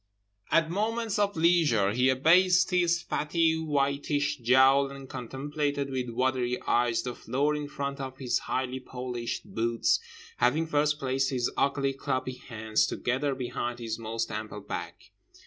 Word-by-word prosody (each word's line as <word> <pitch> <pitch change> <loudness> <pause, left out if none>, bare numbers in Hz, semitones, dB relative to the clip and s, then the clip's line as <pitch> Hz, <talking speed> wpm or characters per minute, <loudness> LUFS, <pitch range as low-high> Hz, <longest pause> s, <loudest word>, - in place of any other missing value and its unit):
At 165 -1 +3
moments 220 +2 -1
of 200 -3 +1
leisure 160 - +3
he 125 +4 +2
abased 180 +7 +4
his 175 -1 +2
fatty 160 +1 +1
whitish 145 -1 0
jowl 130 +3 +4
and 135 -1 -10
contemplated 140 +3 -3
with 130 -2 -2
watery 125 0 0
eyes 120 -1 +1
the 125 - -4
floor 145 +5 -1
in 150 -1 -4
front 140 -1 -4
of 130 -1 -6
his 125 -2 0
highly 130 0 -1
polished 125 -2 -5
boots, 115 +1 +1 0.4
having 160 +2 +2
first 150 -1 +1
placed 135 -1 0
his 125 -3 -1
ugly 140 -1 +1
clubby 130 -1 -2 0.2
hands 110 -2 +1
together 135 +3 -1
behind 120 -1 -3
his 115 -1 -4
most 115 0 -3
ample 105 -1 -5
back. - - -7
135 Hz, 145 wpm, -28 LUFS, 125-150 Hz, 0.4 s, abased